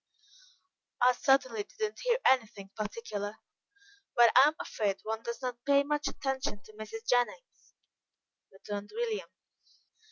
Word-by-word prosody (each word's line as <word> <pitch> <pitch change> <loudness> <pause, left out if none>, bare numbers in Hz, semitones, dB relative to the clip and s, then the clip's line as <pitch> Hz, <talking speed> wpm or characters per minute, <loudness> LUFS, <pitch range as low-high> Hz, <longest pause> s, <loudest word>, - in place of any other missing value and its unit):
"I 250 +1 +5
certainly 255 -3 +2
did 205 - -14
not - - -17
hear - - +2
anything 215 -6 +1
particular, 210 -1 -4 0.8
but 240 -1 +7
I'm 290 +4 +7
afraid 200 -3 -1
one 220 0 -3
never 235 +1 -5
does 255 -1 -2
pay 280 0 +4
much 295 0 -1
attention 270 -4 -2
to 215 - -16
Mrs. 215 +1 -8
Jennings," 250 - -1 0.8
returned 205 +1 -7
William. 460 -2 -2
240 Hz, 125 wpm, -31 LUFS, 215-280 Hz, 0.8 s, but